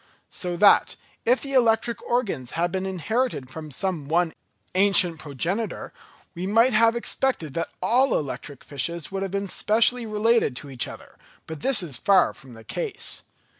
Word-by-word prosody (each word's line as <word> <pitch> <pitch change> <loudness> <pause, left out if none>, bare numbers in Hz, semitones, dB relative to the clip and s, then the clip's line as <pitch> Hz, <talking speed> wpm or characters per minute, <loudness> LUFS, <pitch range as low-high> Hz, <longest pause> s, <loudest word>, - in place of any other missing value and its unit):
So 175 -1 -3
that, 205 +3 +5 0.3
if 250 +2 +3
the 275 -1 -5
electric 230 -2 +2
organs 195 - -2
had 170 +1 0
been 190 0 -2
inherited 190 - -2
from 155 +1 -8
some 160 0 -3
one 165 +1 +1 0.4
ancient 185 -4 +4
progenitor, 170 - -3 0.4
we 180 +2 -4
might 230 +5 +4
have 225 +2 +4
expected 235 - 0
that 165 - -2
all 250 +7 +3
electric 140 -1 -6
fishes 165 +4 -2
would 195 0 -3
have 195 - -2
been 200 +1 -2
specially 230 +4 +2
related 215 - +2
to 140 +2 -8
each 130 - 0
other; - - -12 0.3
but 160 -2 -7
this 240 - +3
is 145 -7 -3
far 200 -1 +3
from 130 -2 -15
the 115 -1 -13
case. 460 - -5
190 Hz, 165 wpm, -24 LUFS, 160-230 Hz, 0.4 s, that